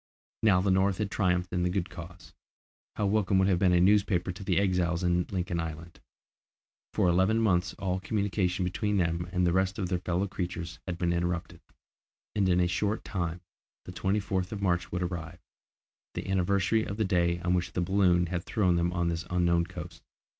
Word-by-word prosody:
Now 100 Hz, -5 st, +4 dB
the 95 Hz, 0 st, +2 dB
North 95 Hz, 0 st, +2 dB
had 105 Hz, -1 st, -2 dB
triumphed 90 Hz, -3 st, 0 dB
in 90 Hz, -, 0 dB
the 90 Hz, -, +1 dB
good 90 Hz, 0 st, -2 dB
cause, 90 Hz, 0 st, -11 dB, 0.6 s
how 105 Hz, -, 0 dB
welcome 100 Hz, -1 st, +2 dB
would 95 Hz, 0 st, +4 dB
have 95 Hz, -3 st, +2 dB
been 95 Hz, -1 st, +4 dB
a 90 Hz, -, +4 dB
newspaper 95 Hz, -1 st, +3 dB
to 90 Hz, +2 st, -9 dB
the 95 Hz, -2 st, 0 dB
exiles 90 Hz, -3 st, +1 dB
in 90 Hz, 0 st, +1 dB
Lincoln 90 Hz, -2 st, -2 dB
Island! 80 Hz, 0 st, -6 dB, 0.9 s
For -, -, +2 dB
eleven 95 Hz, +6 st, +3 dB
months 95 Hz, -4 st, +1 dB
all 95 Hz, -2 st, -2 dB
communication 95 Hz, -2 st, -1 dB
between 105 Hz, +3 st, -1 dB
them 85 Hz, -1 st, 0 dB
and 90 Hz, -1 st, +1 dB
the 85 Hz, -, +2 dB
rest 95 Hz, 0 st, +1 dB
of 95 Hz, -3 st, -2 dB
their 90 Hz, -2 st, 0 dB
fellow 90 Hz, +2 st, -1 dB
creatures 85 Hz, -2 st, -5 dB
had 90 Hz, -2 st, -3 dB
been 85 Hz, -1 st, 0 dB
interrupted, 85 Hz, 0 st, -2 dB, 0.7 s
and 100 Hz, -3 st, +1 dB
in 90 Hz, 0 st, +3 dB
a 90 Hz, -, +3 dB
short 100 Hz, +5 st, -1 dB
time 85 Hz, -3 st, -3 dB, 0.4 s
the -, -, -7 dB
24th 95 Hz, 0 st, -1 dB
of 105 Hz, -, -4 dB
March 90 Hz, -3 st, 0 dB
would 90 Hz, 0 st, -1 dB
arrive, 85 Hz, -1 st, -5 dB, 0.8 s
the -, -, -4 dB
anniversary 95 Hz, +3 st, +1 dB
of 100 Hz, -, -5 dB
the 110 Hz, -, +1 dB
day 85 Hz, -2 st, +1 dB
on 90 Hz, +1 st, +1 dB
which 90 Hz, -1 st, -1 dB
the 90 Hz, -, 0 dB
balloon 90 Hz, -1 st, +3 dB
had 90 Hz, 0 st, -3 dB
thrown 95 Hz, -7 st, +1 dB
them 85 Hz, +1 st, +1 dB
on 85 Hz, -1 st, 0 dB
this 85 Hz, +1 st, -3 dB
unknown 85 Hz, -1 st, +2 dB
coast. 85 Hz, -2 st, -9 dB
90 Hz, 195 wpm, -29 LUFS, 85-95 Hz, 0.9 s, Now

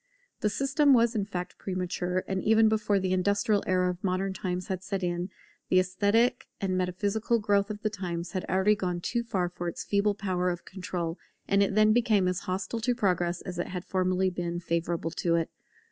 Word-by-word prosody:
The 210 Hz, -, +1 dB
system 275 Hz, +5 st, +3 dB
was 235 Hz, 0 st, +3 dB
in 210 Hz, -4 st, 0 dB
fact 180 Hz, -2 st, -5 dB
premature; 180 Hz, -1 st, -2 dB
and 190 Hz, -1 st, -1 dB
even 220 Hz, +2 st, +5 dB
before 215 Hz, -2 st, +2 dB
the 185 Hz, -1 st, 0 dB
industrial 200 Hz, +2 st, +2 dB
era 185 Hz, 0 st, +2 dB
of 180 Hz, 0 st, -10 dB
modern 190 Hz, 0 st, 0 dB
times 180 Hz, 0 st, -3 dB
had 185 Hz, -2 st, -3 dB
set 195 Hz, 0 st, -3 dB
in, 175 Hz, +1 st, -1 dB, 0.4 s
the 185 Hz, -, +5 dB
esthetic 210 Hz, +7 st, +2 dB
and 190 Hz, -2 st, -1 dB
metaphysical 200 Hz, +5 st, 0 dB
growth 205 Hz, -1 st, +1 dB
of 210 Hz, 0 st, -6 dB
the 215 Hz, -, +2 dB
times 175 Hz, -4 st, -4 dB
had 185 Hz, -2 st, -2 dB
already 190 Hz, +3 st, +3 dB
gone 180 Hz, -4 st, -2 dB
too 235 Hz, +7 st, -1 dB
far 195 Hz, -6 st, -1 dB
for 175 Hz, 0 st, -5 dB
its 170 Hz, -, -4 dB
feeble 205 Hz, 0 st, +1 dB
power 185 Hz, -3 st, 0 dB
of 175 Hz, -1 st, -4 dB
control; 180 Hz, -3 st, -4 dB, 0.3 s
and 200 Hz, 0 st, +3 dB
it 200 Hz, 0 st, +1 dB
then 215 Hz, 0 st, +5 dB
became 220 Hz, -5 st, +3 dB
as 180 Hz, 0 st, 0 dB
hostile 190 Hz, +5 st, -2 dB
to 245 Hz, +2 st, 0 dB
progress 180 Hz, -5 st, 0 dB
as 180 Hz, -2 st, -6 dB
it -, -, -1 dB
had 180 Hz, -1 st, -5 dB
formerly 185 Hz, 0 st, +1 dB
been 175 Hz, -1 st, -3 dB
favourable 170 Hz, -1 st, -1 dB
to 170 Hz, 0 st, 0 dB
it. 165 Hz, -1 st, 0 dB
190 Hz, 200 wpm, -28 LUFS, 180-210 Hz, 0.4 s, even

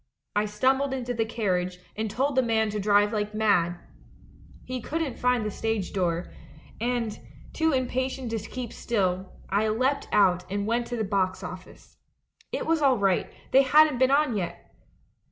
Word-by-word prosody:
I 210 Hz, +1 st, +2 dB
stumbled 265 Hz, +6 st, +1 dB
into 245 Hz, -1 st, -3 dB
the 225 Hz, -1 st, 0 dB
carriage, 185 Hz, -5 st, -1 dB, 0.2 s
and 220 Hz, 0 st, -2 dB
told 265 Hz, +6 st, 0 dB
the 260 Hz, -, +5 dB
man 220 Hz, -3 st, +1 dB
to 210 Hz, -, -3 dB
drive 205 Hz, +1 st, +3 dB
like 210 Hz, 0 st, -2 dB
mad. 180 Hz, -5 st, +2 dB, 0.9 s
"He 255 Hz, -1 st, -4 dB
couldn't 310 Hz, 0 st, -3 dB
find 250 Hz, -3 st, +2 dB
the 210 Hz, -, -2 dB
stage 220 Hz, -2 st, -2 dB
door, 175 Hz, -3 st, -1 dB, 0.5 s
and, 235 Hz, -2 st, -1 dB, 0.3 s
too 320 Hz, 0 st, +2 dB
im 260 Hz, -2 st, +1 dB
patient 260 Hz, -1 st, -3 dB
to 225 Hz, -, -1 dB
keep 235 Hz, +3 st, -6 dB
still, 190 Hz, -4 st, -1 dB, 0.2 s
I 205 Hz, +3 st, +2 dB
leapt 255 Hz, +6 st, 0 dB
out 180 Hz, -3 st, +4 dB
and 200 Hz, 0 st, -1 dB
went 235 Hz, +2 st, 0 dB
to 245 Hz, -, -3 dB
the 220 Hz, -, 0 dB
box 195 Hz, -2 st, 0 dB
office. 185 Hz, 0 st, -10 dB, 0.5 s
It -, -, -2 dB
was 325 Hz, -1 st, +1 dB
all 270 Hz, -3 st, +4 dB
right, 195 Hz, -3 st, +1 dB, 0.2 s
they 265 Hz, -, +7 dB
hadn't 295 Hz, 0 st, +5 dB
been 260 Hz, 0 st, +4 dB
on 280 Hz, -3 st, +3 dB
yet! 180 Hz, -4 st, -5 dB
220 Hz, 170 wpm, -26 LUFS, 200-255 Hz, 0.9 s, they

